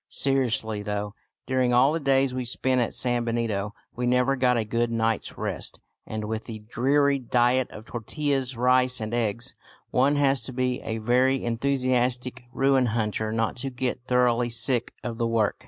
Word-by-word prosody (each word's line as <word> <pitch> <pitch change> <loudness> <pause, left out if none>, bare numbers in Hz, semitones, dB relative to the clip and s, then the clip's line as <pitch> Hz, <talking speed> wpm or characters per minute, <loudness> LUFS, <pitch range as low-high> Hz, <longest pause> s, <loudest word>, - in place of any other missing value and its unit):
Seriously 120 -6 +1
though, 105 0 -3 0.3
during 130 -1 +1
all 135 +4 +5
the 165 - 0
days 135 -2 +2
we 130 0 -2
spent 130 +1 0
at 120 - -1
San 120 -1 +1
Benito 115 -3 -2 0.2
we 125 0 -1
never 125 +2 +3
got 125 -2 +2
a 110 - 0
good 115 +2 0
night's 115 -1 -1
rest; - - -4 0.3
and 110 -1 -4
with 110 +1 -4
the 115 -2 -6
dreary 140 +6 +1
diet 125 +1 +2
of 110 - -11
tortillas, 135 +1 -2
rice, 125 +1 +3
and 110 +1 -4
eggs, 115 -1 0 0.4
one 135 +3 +3
has 140 -2 +2
to 120 +3 -7
be 125 0 -1
a 110 - -3
very 125 +4 +2
enthusiastic 125 0 0
ruin 135 -1 +3
hunter 110 -1 -1
not 115 +1 -1
to 135 +2 -1
get 125 -1 -3
thoroughly 125 -1 +2
sick 120 +1 +1
of 115 -1 -5
the 115 - +1
work. 115 -2 +1
125 Hz, 170 wpm, -26 LUFS, 115-130 Hz, 0.4 s, all